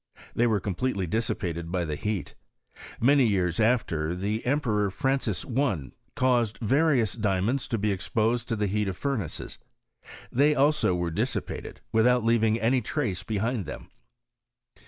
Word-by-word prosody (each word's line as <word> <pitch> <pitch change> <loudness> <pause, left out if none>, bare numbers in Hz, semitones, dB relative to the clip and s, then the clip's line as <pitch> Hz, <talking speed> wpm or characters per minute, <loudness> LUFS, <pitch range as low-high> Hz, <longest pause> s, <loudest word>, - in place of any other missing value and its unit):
They 120 - +2
were 110 -3 +2
completely 100 +1 -2
dissipated 85 -4 -2
by 90 -2 0
the 75 - -3
heat. 105 +2 -3 0.7
Many 135 +1 +5
years 90 -5 0
after, 90 -9 +1
the 105 +4 -2
Emperor 115 -8 +1
Fran 135 +8 0
cis 110 -7 -3
I. 120 - -1 0.2
caused 120 -5 +2
various 130 0 +2
diamonds 110 +4 0
to 115 - -1
be 105 0 0
exposed 110 +6 0
to 115 - -1
the 105 -1 0
heat 105 +1 0
of 95 -1 -3
furnaces. 125 - -3 0.7
They 145 +4 +3
also 145 -9 +3
were 85 -1 -1
dissipated, - - -3
with 110 +1 +4
out 125 -1 +3
leaving 115 -1 +2
any 125 +3 +2
trace 110 - -2
behind 110 0 -2
them. - - -8
110 Hz, 150 wpm, -27 LUFS, 95-125 Hz, 0.7 s, Many